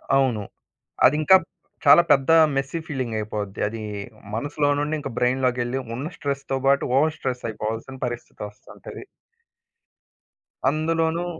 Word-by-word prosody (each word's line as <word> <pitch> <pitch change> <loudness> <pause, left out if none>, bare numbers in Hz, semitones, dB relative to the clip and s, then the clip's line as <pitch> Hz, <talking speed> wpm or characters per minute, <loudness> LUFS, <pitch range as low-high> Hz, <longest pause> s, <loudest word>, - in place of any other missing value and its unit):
అవును. 130 -6 +2 0.6
అదింకా 155 +5 +6 0.5
చాలా 145 +4 +8
పెద్ద 135 0 +3 0.3
మెస్సీ 135 +4 -2
ఫీలింగ్ 130 -6 -3
అయిపోద్ది. 105 -2 -5
అది 110 +1 -6 0.5
మనసులో 145 +4 0
నుండి 150 +2 -1
ఇంకా 135 -2 -6
బ్రైన్ 125 +2 +1
లోకెళ్ళి 125 +1 0 0.2
ఉన్న 130 +4 -4
స్ట్రెస్‌తో 140 -1 -2
పాటు 140 0 +3
ఓవర్ 155 +2 +2
స్ట్రెస్ 125 -4 -3
అయిపోవాల్సిన 110 +4 -5
పరిస్థితి 120 -1 -7
వస్తుంటది. 105 +1 -12 1.6
అందులోనూ 160 +3 0
135 Hz, 115 wpm, -23 LUFS, 120-145 Hz, 1.6 s, చాలా